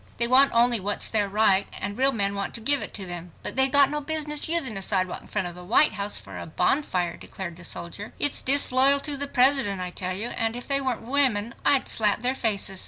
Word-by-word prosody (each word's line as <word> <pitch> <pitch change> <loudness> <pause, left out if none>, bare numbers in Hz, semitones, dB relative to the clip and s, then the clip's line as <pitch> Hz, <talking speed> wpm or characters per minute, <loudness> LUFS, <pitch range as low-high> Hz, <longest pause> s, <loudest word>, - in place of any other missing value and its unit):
They 235 - +2
want 265 +3 +4
only 235 0 +3
what's 205 +2 -1
their 210 -2 -1
right 200 -1 +3
and 200 +1 -6
real 265 +3 +2
men 200 -4 -1
want 200 0 -5
to - - -4
give 280 +5 +2
it - - -7
to 195 - -4
them." 175 -1 -7
"But - - -5
they've 265 0 +3
got 280 -1 +5
no 300 0 -4
business 300 0 0
using 320 -10 -1
a 195 - -3
sidewalk 185 -2 -1
in - - -18
front 205 -4 -4
of 175 - -8
the 180 +1 -12
White 235 +11 +3
House 200 0 -1
for - - -11
a - - -9
bonfire," 180 - -2
declared 175 -3 -9
the 180 - -13
soldier. 175 +4 -6
"It's 290 - +2
disloyal 275 0 +5
to 295 -1 0
the 285 +1 -2
President, 255 -7 +2
I 180 -1 -4
tell 185 0 -1
you, 220 +5 -3
and 225 0 -3
if 245 - -8
they 275 0 0
weren't 255 -4 -4
women 240 -4 -1
I'd 275 -2 +2
slap 210 0 +1
their 250 +1 +1
faces." 200 -6 -2
225 Hz, 240 wpm, -23 LUFS, 195-270 Hz, -, got